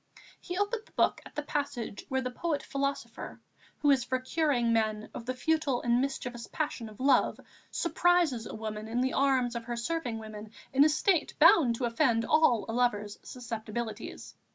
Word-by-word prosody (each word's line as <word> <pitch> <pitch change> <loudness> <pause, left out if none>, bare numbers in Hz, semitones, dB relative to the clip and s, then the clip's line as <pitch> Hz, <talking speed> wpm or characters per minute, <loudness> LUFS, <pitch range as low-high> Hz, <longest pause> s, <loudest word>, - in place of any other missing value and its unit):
He 355 -1 -5
opened 435 +3 -1
the - - -23
book - - +2
at - - -19
the 295 - -2
passage 280 -8 -4
where 265 0 0
the 255 -1 -3
poet 305 +2 -2
philosopher, 275 0 -4 0.4
who 290 - +6
is 265 -3 +3
for 260 +1 0
curing 255 -4 +1
men 215 -1 0
of 235 - -8
the 255 - -1
futile 305 -2 0
and 240 +1 +3
mischievous 250 -3 -4
passion 280 -7 -3
of 210 - -15
love, 270 +1 +3 0.3
surprises 345 -10 +2
a - - -7
woman 215 0 -5
in 235 +2 -1
the 260 +1 0
arms 260 -3 +2
of 235 -1 -4
her 240 0 -4
serving 245 -2 -2
women 215 -1 -8 0.2
in 275 +2 +6
a 305 - +5
state 335 +2 +1
bound 300 -6 +6
to 245 - -2
offend 230 -1 +2
all 255 -9 +4
a 225 - -4
lover's 210 -4 0
susceptibilities. 225 -2 -6
250 Hz, 180 wpm, -30 LUFS, 230-290 Hz, 0.4 s, who